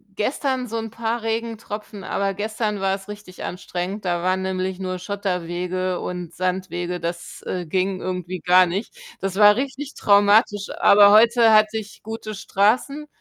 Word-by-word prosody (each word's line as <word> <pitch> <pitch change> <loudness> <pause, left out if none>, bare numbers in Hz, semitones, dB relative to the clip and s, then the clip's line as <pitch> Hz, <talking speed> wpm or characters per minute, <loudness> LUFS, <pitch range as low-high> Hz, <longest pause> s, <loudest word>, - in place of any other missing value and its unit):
gestern 260 +2 -1
so 230 +1 -4
'n 225 0 -4
paar 230 0 -2
Regentropfen, 220 -3 -5
aber 195 +1 -1
gestern 210 0 -3
war 195 0 +1
es 195 0 -6
richtig 205 -3 -10
anstrengend. 180 +3 -5
Da 175 -1 -1
waren 185 +1 0
nämlich 190 0 -3
nur 185 -1 -4
Schotterwege 180 -1 -3
und 180 -2 -5
Sandwege, 180 -1 -2
das, 170 +1 -6
äh, 180 -1 -4
ging 185 +3 -1
irgendwie 180 -1 -4
gar 180 +2 +5
nicht. 190 - -4 0.3
Das 195 0 -3
war 210 0 +7
richtig 275 +2 -4
traumatisch, 205 0 +3
aber 200 0 +7
heute 225 +1 +6
hatte 215 +1 +4
ich 210 -1 -9
gute 215 -1 -6
Straßen 250 +10 0
200 Hz, 155 wpm, -22 LUFS, 185-220 Hz, 0.3 s, war